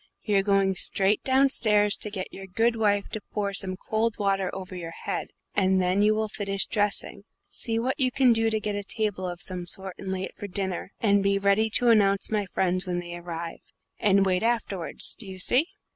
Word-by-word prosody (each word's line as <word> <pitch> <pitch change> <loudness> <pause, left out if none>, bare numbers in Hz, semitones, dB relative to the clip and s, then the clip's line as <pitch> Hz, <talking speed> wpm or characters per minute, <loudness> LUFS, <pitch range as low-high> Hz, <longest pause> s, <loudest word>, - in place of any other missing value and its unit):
You're 205 -2 +2
going 195 -1 +2
straight 195 +2 +2
downstairs 225 -6 +4
to 210 - -3
get 190 -3 -6
your 195 0 -9
good 225 +5 +1
wife 205 -2 +1
to 220 - -5
pour 200 -1 -2
some 190 -1 -3
cold 220 +2 -1
water 195 -2 0
over 185 0 -7
your 170 -2 -6 0.2
head; - - -2 0.3
and 190 -1 +2
then 185 +2 +1
you 215 +1 +4
will 220 0 -1
finish 200 -2 -1
dressing, 205 -2 -1 0.2
see 225 -1 -3
what 255 +6 -1
you 255 -2 +2
can 255 -2 +4
do 225 0 +2
to 220 -1 0
get 210 -1 -3
a 205 - -3
table 200 -3 -2
of 175 -1 -7
some 180 -2 -3
sort 190 +1 -2
and 190 -1 -5
lay 190 0 -3
it - - -7
for 205 - -7
dinner, 190 -1 -3
and 200 -2 +3
be 200 0 +2
ready 200 +2 +2
to 245 - +4
announce 200 -3 +3
my 210 -2 0
friends 185 0 -1
when 180 -1 -1
they 175 0 -7
arrive, 170 -1 -7 0.4
and 195 -1 +3
wait 185 -1 +1
afterwards. 220 -6 -1
Do 215 - -4
you 190 -1 -8
see?" 250 - +2
200 Hz, 210 wpm, -26 LUFS, 190-215 Hz, 0.4 s, downstairs